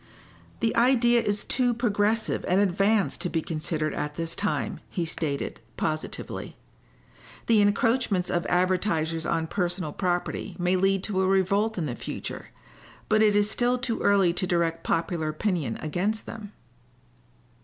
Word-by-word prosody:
"The 225 - +1
idea 240 -1 +4
is 205 -1 -1
too 245 -2 +2
progressive 220 -1 +1
and 185 +2 +3
advanced 200 +2 +2
to 180 - 0
be 165 -2 -1
considered 155 -1 -2
at 150 0 -3
this 165 0 -3
time," 205 - -2
he 175 - -2
stated, 155 -3 -3 0.2
positively. 155 0 -4 0.9
"The 225 -2 +4
encroachments 205 -2 +2
of 175 -1 0
advertisers 175 -3 +1
on 165 -1 0
personal 175 -3 -2
property 180 -2 -2
may 180 0 +1
lead 195 +1 +2
to 195 -3 0
a 190 - +2
revolt 195 +3 +2
in 170 - -1
the 125 -5 -3
future, - - -6 0.6
but 215 0 +4
it 210 -1 +4
is 205 0 +3
still 245 +1 +1
too 245 -2 -2
early 195 -4 +3
to 185 - -1
direct 165 -2 0
popular 165 -1 -1
opinion 155 - -1
against 190 +8 -1
them." 210 -2 -8
190 Hz, 145 wpm, -26 LUFS, 165-215 Hz, 0.9 s, idea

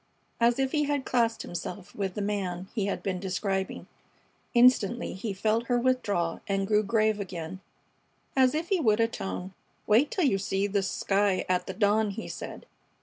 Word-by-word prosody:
as 235 +1 +4
if 265 -1 0
he 300 -1 +1
had 285 -2 -1
classed 230 -2 +1
himself 180 +3 -6
with 195 -3 -3
the 210 - -2
"man" 190 -3 -2
he 205 -4 -1
had 200 - -3
been 185 -2 -2
describing. 190 +1 -2 0.7
Instantly 240 -2 +4
he 205 +3 -4
felt 220 +4 0
her 245 - +2
withdrawal 225 -9 0
and 195 -1 0
grew 210 +1 +3
grave 215 0 +1
again, 180 -2 -5 0.8
as 260 0 +4
if 325 +2 -2
he 385 - +2
would 220 -7 +3
atone. 195 -4 -2 0.3
"Wait 230 +8 +4
till 365 - +1
you 195 -8 +2
see 195 0 0
this 200 -1 0
sky 200 -1 +1
at 180 -1 0
the 190 - -4
dawn," 210 +1 +3
he 205 +3 -5
said. - - -7
205 Hz, 175 wpm, -28 LUFS, 195-235 Hz, 0.8 s, as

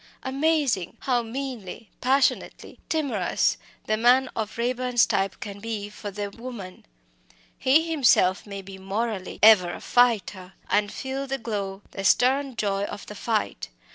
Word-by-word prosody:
Amazing! 275 - 0
how 250 -3 +1
meanly, 235 -4 -6
passionately 265 +2 0
timorous 265 - 0 0.3
the 215 - +1
man 250 +3 +4
of 220 -1 -4
Raeburn's 245 0 +2
type 195 0 -1
can 205 -2 -7
be 210 -1 -4
for 210 0 -7
the 205 0 -5
woman! 225 - -9 0.7
He 305 +6 +4
himself 220 - +3
may 200 -1 -7
be 190 0 -10
morally 195 0 -3
"ever 205 -5 +7
a - - -7
fighter," 205 -6 +1 0.2
and 205 0 +2
feel 270 +1 -4
the 270 0 -2
glow, 200 -4 -4
the 195 - -6
stern 260 +5 +3
joy 200 -2 -1
of 205 - -7
the - - -9
fight. 210 - -2
225 Hz, 140 wpm, -25 LUFS, 200-255 Hz, 0.7 s, ever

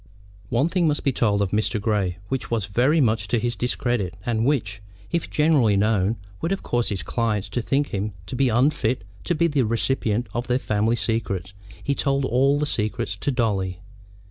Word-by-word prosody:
One 120 +7 +2
thing 175 -1 +1
must 150 -1 0
be 140 - +2
told 105 -5 +2
of 95 - -2
Mr. 110 +1 0
Grey 100 -4 0
which 135 +2 -3
was 115 -4 0
very 125 +10 +2
much 115 -5 +2
to 120 - +1
his 120 +1 -1
discredit, 120 -7 -1
and 115 -1 0
which, 105 -8 0 0.3
if 170 - -1
generally 145 -10 +3
known, 105 0 +2 0.3
would 165 - 0
have 195 +1 -2
caused 120 -1 0
his 100 -3 -2
clients 110 -4 -1
to 120 - -1
think 140 +4 0
him 100 +1 -3
to 95 - -6
be 135 0 +2
unfit 120 -2 +2 0.2
to 175 - +1
be 170 +2 +2
the 150 -4 +2
recipient 115 0 0
of 120 +1 -3
their 125 0 +2
family 110 -1 +1
secrets; 100 -5 -2 0.3
he 140 - +1
told 140 -1 +1
all 135 +3 +3
the 150 - 0
secrets 105 -7 -2
to 145 - -2
Dolly. 100 -8 0
115 Hz, 195 wpm, -24 LUFS, 105-135 Hz, 0.3 s, generally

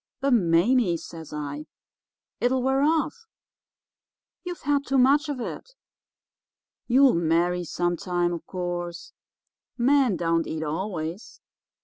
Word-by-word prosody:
"'But, 275 -1 +1
Mame,' 180 +1 +3
says 160 -1 -10
I, 150 0 -5 0.7
'it'll 250 +1 +1
wear 265 +1 +2
off. 325 +10 0 1.2
You've 355 -3 -6
had 285 0 +1
too 275 -1 0
much 285 +4 +4
of 280 -3 -3
it. 485 - -7 1.1
You'll 260 +2 +5
marry 170 +2 +1
some 175 +1 -1
time, 175 -1 -1
of 170 - -5
course. 175 -1 -5 0.6
Men 260 -4 +3
don't 165 -1 0
eat 160 0 -3
always. 165 +3 -4
185 Hz, 115 wpm, -25 LUFS, 170-270 Hz, 1.2 s, You'll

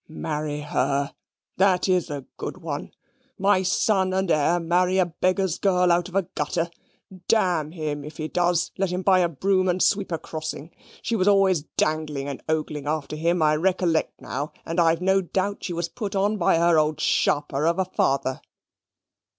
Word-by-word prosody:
Marry 150 -1 -4
HER, 140 0 -1 0.4
that 190 -1 +3
IS 180 -2 +1
a 140 -3 -5
good - - -5
one. 155 -5 -5 0.5
My 195 -1 +3
son 190 0 +1
and 190 -2 0
heir 160 +3 +2
marry 180 +2 +1
a 185 - +4
beggar's 185 +1 0
girl 180 -2 +3
out 175 +1 +1
of 185 - -12
a 195 - +3
gutter. 165 +2 -3 0.6
D - - +5
him, 155 -6 -1
if 150 +2 -10
he 155 - -3
does, 175 0 +1
let 195 -1 +1
him 180 +1 -3
buy 190 -1 +5
a 175 -1 +2
broom 185 +4 +1
and 180 +1 0
sweep 195 0 +1
a 165 - 0
crossing. 155 0 -6 0.3
She 230 - -1
was 190 -2 +1
always 195 -6 +3
dangling 155 -3 -1
and 140 -2 -5
ogling 150 -2 -2
after 155 -1 -2
him, 165 +2 +1
I 155 0 +4
recollect 175 -1 0
now; 145 +3 -5
and 165 +2 -2
I've 165 0 +3
no 190 +1 +3
doubt 195 +2 -2
she 180 - -3
was 170 0 -2
put 200 +3 -5
on 205 +2 +1
by 170 -3 +3
her 170 -1 +4
old 155 0 0
sharper 145 +1 +1
of 170 - +1
a 190 - +1
father." 135 -6 0
170 Hz, 185 wpm, -24 LUFS, 155-185 Hz, 0.6 s, D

